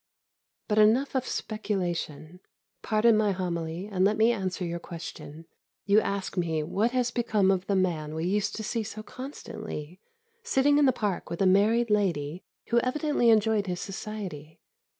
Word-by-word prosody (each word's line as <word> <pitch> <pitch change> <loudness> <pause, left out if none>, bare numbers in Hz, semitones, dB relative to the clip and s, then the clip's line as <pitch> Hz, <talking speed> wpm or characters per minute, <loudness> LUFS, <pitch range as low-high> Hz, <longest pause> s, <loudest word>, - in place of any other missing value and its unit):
But 215 -1 +2
enough 230 +6 +4
of 260 -1 -1
speculation. 180 -6 -3 0.4
Pardon 220 +1 +3
my 210 -2 +2
homily, 170 -1 -3
and 195 -3 -1
let 210 +2 +3
me 225 +2 +5
answer 190 -4 -2
your 170 0 -3
question. 165 -2 -9 0.4
You 205 +2 +5
ask 200 -2 -3
me 165 -4 0
what 205 +9 +1
has 250 -1 0
become 215 -5 +2
of 190 0 -1
the 200 - +1
man 160 -5 0
we 160 +1 -2
used 200 +3 0
to 220 - -5
see 230 +2 -1
so 215 0 -7
constantly, 215 - -8 0.4
sitting 290 - +3
in 290 - +5
the - - +6
Park 210 -6 -3
with 170 - -5
a 195 - +3
married 215 +5 +3
lady 175 -6 0 0.3
who 235 - +4
evidently 275 0 +1
enjoyed 215 -2 +3
his 180 -1 -2
society. 190 -7 -7
205 Hz, 165 wpm, -28 LUFS, 175-225 Hz, 0.4 s, the